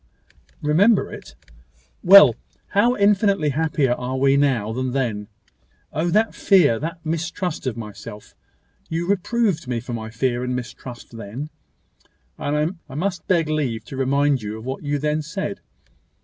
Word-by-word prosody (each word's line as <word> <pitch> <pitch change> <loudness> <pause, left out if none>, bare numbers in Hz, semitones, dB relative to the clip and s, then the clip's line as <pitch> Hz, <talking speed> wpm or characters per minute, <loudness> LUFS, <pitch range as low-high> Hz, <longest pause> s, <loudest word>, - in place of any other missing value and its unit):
"Remember 190 +9 +3
it!" - - -11 0.7
"Well. 200 +2 +9 0.3
How 235 +5 +3
infinitely 200 -5 +3
happier 150 -2 +1
are 125 +1 -2
we 135 +1 +3
now 130 -7 +1
than 130 +1 -2
then! 115 -6 -2 0.7
Oh! 165 +3 0
that 215 +5 +2
fear 155 - +4
that 165 +2 -6
mistrust 165 0 -3
of 120 -3 -2
myself! 105 -1 -9 0.6
You 165 +1 -2
reproved 200 - 0
me 125 -2 -1
for 120 +1 -7
my 110 -1 -5
fear 120 +2 -1
and 125 0 -2
mistrust 125 -1 -8
then; 115 +8 -7 0.9
and 150 +4 0 0.2
I 130 - -9
must 180 +3 -3
beg 170 -4 +2
leave 130 -8 -2
to - - -8
remind 140 0 +1
you 105 +1 -5
of 110 - -10
what 130 +1 -4
you 145 0 -1
then 150 +2 0
said. 150 - -4
145 Hz, 150 wpm, -22 LUFS, 125-170 Hz, 0.9 s, Well